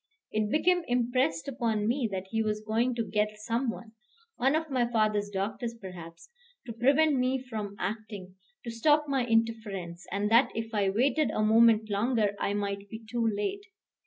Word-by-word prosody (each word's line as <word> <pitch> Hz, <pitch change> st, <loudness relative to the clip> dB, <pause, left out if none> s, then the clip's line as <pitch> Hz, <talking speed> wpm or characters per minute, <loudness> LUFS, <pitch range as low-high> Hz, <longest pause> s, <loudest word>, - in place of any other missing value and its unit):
It 215 Hz, -1 st, 0 dB
became 355 Hz, +6 st, +2 dB
impressed 245 Hz, -9 st, 0 dB
upon 230 Hz, -5 st, -1 dB
me 240 Hz, -1 st, 0 dB
that 190 Hz, -1 st, -3 dB
he 225 Hz, 0 st, +1 dB
was 215 Hz, -1 st, -2 dB
going 230 Hz, +3 st, +1 dB
to 230 Hz, -1 st, -1 dB
get 210 Hz, +1 st, -1 dB
some 230 Hz, +4 st, -1 dB
one 225 Hz, -1 st, -7 dB, 0.4 s
one 265 Hz, +4 st, +2 dB
of 320 Hz, -1 st, -2 dB
my 245 Hz, -3 st, +1 dB
father's 215 Hz, -2 st, +1 dB
doctors, 210 Hz, +4 st, -3 dB
perhaps 180 Hz, -, -11 dB, 0.3 s
to 235 Hz, -, -6 dB
prevent 275 Hz, +5 st, +3 dB
me 255 Hz, +1 st, +1 dB
from 220 Hz, -6 st, -6 dB
acting, 200 Hz, -1 st, -5 dB, 0.3 s
to 235 Hz, -, -5 dB
stop 295 Hz, +6 st, +3 dB
my 265 Hz, -3 st, 0 dB
interference, 215 Hz, -6 st, -1 dB
and 205 Hz, +2 st, -1 dB
that 235 Hz, +4 st, +6 dB
if 225 Hz, 0 st, -4 dB
I 200 Hz, -2 st, +2 dB
waited 275 Hz, +9 st, +2 dB
a 215 Hz, -, 0 dB
moment 220 Hz, 0 st, +4 dB
longer 210 Hz, 0 st, +1 dB
I 200 Hz, -, -1 dB
might 200 Hz, 0 st, -3 dB
be 220 Hz, +2 st, -9 dB
too 230 Hz, 0 st, 0 dB
late. 220 Hz, -, -2 dB
225 Hz, 175 wpm, -29 LUFS, 205-245 Hz, 0.4 s, that